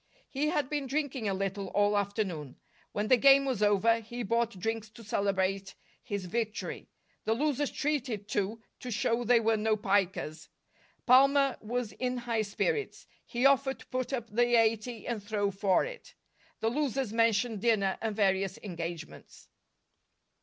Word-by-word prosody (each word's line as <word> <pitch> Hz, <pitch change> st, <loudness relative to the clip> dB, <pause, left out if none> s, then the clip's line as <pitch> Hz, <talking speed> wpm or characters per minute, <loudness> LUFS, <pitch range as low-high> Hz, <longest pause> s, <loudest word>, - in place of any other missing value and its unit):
He 285 Hz, +3 st, 0 dB
had 295 Hz, -4 st, 0 dB
been 290 Hz, -1 st, -2 dB
drinking 270 Hz, -5 st, -1 dB
a -, -, 0 dB
little 195 Hz, 0 st, -3 dB
all 205 Hz, +2 st, +2 dB
afternoon. 195 Hz, -, -2 dB, 0.4 s
When 210 Hz, +1 st, -2 dB
the 255 Hz, -, +6 dB
game 275 Hz, +2 st, +6 dB
was 255 Hz, -6 st, -1 dB
over, 210 Hz, +2 st, +4 dB
he 235 Hz, +2 st, -6 dB
bought 230 Hz, 0 st, 0 dB
drinks 220 Hz, +3 st, -3 dB
to 230 Hz, +2 st, -14 dB
celebrate 195 Hz, -2 st, -1 dB, 0.3 s
his 200 Hz, -5 st, -4 dB
victory. 220 Hz, +3 st, -4 dB, 0.4 s
The 220 Hz, -, +2 dB
losers 290 Hz, +1 st, 0 dB
treated, 255 Hz, -9 st, -2 dB
too, 210 Hz, +3 st, -2 dB, 0.2 s
to 250 Hz, -, -7 dB
show 235 Hz, +1 st, 0 dB
they 240 Hz, 0 st, +5 dB
were 225 Hz, 0 st, +2 dB
no 215 Hz, 0 st, +1 dB
pikers. 195 Hz, -6 st, -1 dB, 0.6 s
Palmer 275 Hz, +2 st, +5 dB
was 235 Hz, 0 st, -3 dB
in 250 Hz, +4 st, -2 dB
high 235 Hz, -2 st, -1 dB
spirits. 420 Hz, -, -2 dB, 0.2 s
He 245 Hz, +1 st, -2 dB
offered 275 Hz, -1 st, +4 dB
to -, -, -15 dB
put 255 Hz, +1 st, -2 dB
up 240 Hz, -4 st, -3 dB
the 240 Hz, +2 st, +3 dB
eighty 225 Hz, +1 st, 0 dB
and 235 Hz, -3 st, -3 dB
throw 205 Hz, -1 st, -1 dB
for 195 Hz, -1 st, +2 dB
it. -, -, -10 dB, 0.5 s
The 225 Hz, -, +2 dB
losers 265 Hz, -4 st, -1 dB
mentioned 230 Hz, -1 st, +2 dB
dinner 205 Hz, -5 st, +2 dB
and 220 Hz, -2 st, -2 dB
various 195 Hz, -2 st, +1 dB
engagements. 170 Hz, -4 st, -7 dB
225 Hz, 155 wpm, -30 LUFS, 200-250 Hz, 0.6 s, the